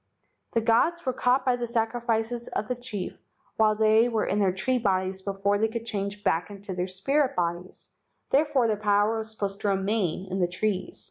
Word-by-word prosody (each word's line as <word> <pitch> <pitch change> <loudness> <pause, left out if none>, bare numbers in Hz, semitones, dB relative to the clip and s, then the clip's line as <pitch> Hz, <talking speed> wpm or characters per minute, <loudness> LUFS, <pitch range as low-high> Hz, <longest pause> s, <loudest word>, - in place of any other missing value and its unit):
The 230 - +2
gods 270 +10 +2
were 255 - 0
caught 250 +2 +2
by 255 -1 +3
the 240 -1 -3
sacrifices 230 0 -1
of 215 - -3
the 250 - -1
chief 220 -6 -6 0.4
while 215 -1 +4
they 220 +2 +4
were 225 -2 0
in 205 - 0
their 195 -2 +3
tree 230 +8 0
bodies 190 -3 0
before 200 +1 0
they 220 - +3
could 230 +1 -5
change 205 -2 -4
back 165 -3 +1
into 200 -1 -7
their 180 0 -2
spirit 260 +10 0
bodies, 175 +1 -3 0.4
therefore 285 -3 +3
their 215 -2 0
power 205 +1 +2
was 220 0 -5
supposed 200 -2 -4
to - - -1
remain 195 -2 0
in 190 - -1
the 180 - +3
trees. 185 +1 -2
215 Hz, 195 wpm, -27 LUFS, 195-235 Hz, 0.4 s, while